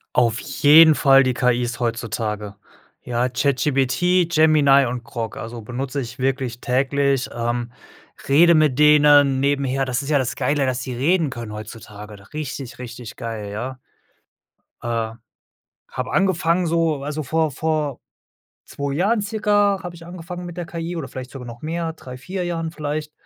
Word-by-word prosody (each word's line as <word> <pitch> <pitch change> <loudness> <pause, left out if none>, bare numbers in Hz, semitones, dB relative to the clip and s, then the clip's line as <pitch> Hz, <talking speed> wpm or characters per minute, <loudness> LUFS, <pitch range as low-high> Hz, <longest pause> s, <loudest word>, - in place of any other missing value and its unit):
Auf 120 -2 +2
jeden 155 +1 +6
Fall 135 -1 +5
die 130 - +1
KIs 120 -1 0
heutzutage. 110 -3 -3 0.5
Ja, 120 +1 0
ChatGPT, 140 +6 +1
Gemini 150 -3 +5
und 120 0 -4
Grok, 115 -2 -5
also 115 +1 -7
benutze 130 +5 -4
ich 125 0 -7
wirklich 130 -2 -2
täglich, 135 +1 +1
ähm, 120 0 -2 0.6
rede 170 +5 +6
mit 150 -4 +2
denen 145 -2 +5
nebenher. 135 -1 0
Das 130 -1 -1
ist 140 - -7
ja 150 - +3
das 130 -1 -2
Geile, 140 +1 +1
dass 130 -1 -1
sie 125 -1 -5
reden 160 +5 +1
können 120 -4 -7
heutzutage. 105 -1 -9 0.2
Richtig, 140 -5 -6
richtig 120 -2 -9
geil, 110 -3 -5
ja. 125 +5 -5 1.0
Äh, 115 -1 -2 0.8
habe 130 0 -4
angefangen 180 -2 +1
so 165 -3 0
also 150 +2 -4
vor 160 +3 0
vor 150 -2 -2 0.7
2 140 0 -4
Jahren 205 +7 +1
circa 205 -2 +1
habe 180 -1 -7
ich 170 0 -12
angefangen 175 +1 -8
mit 175 -1 -8
der 175 - -4
KI 170 -1 -5
oder 160 -5 -5
vielleicht 130 -1 -8
sogar 130 -3 -9
noch 120 0 -10
mehr, 165 +1 -3
3, 125 -5 -10
4 180 +7 -4
Jahren 165 -2 -3
vielleicht. 150 -1 -4
140 Hz, 155 wpm, -21 LUFS, 125-160 Hz, 1.0 s, jeden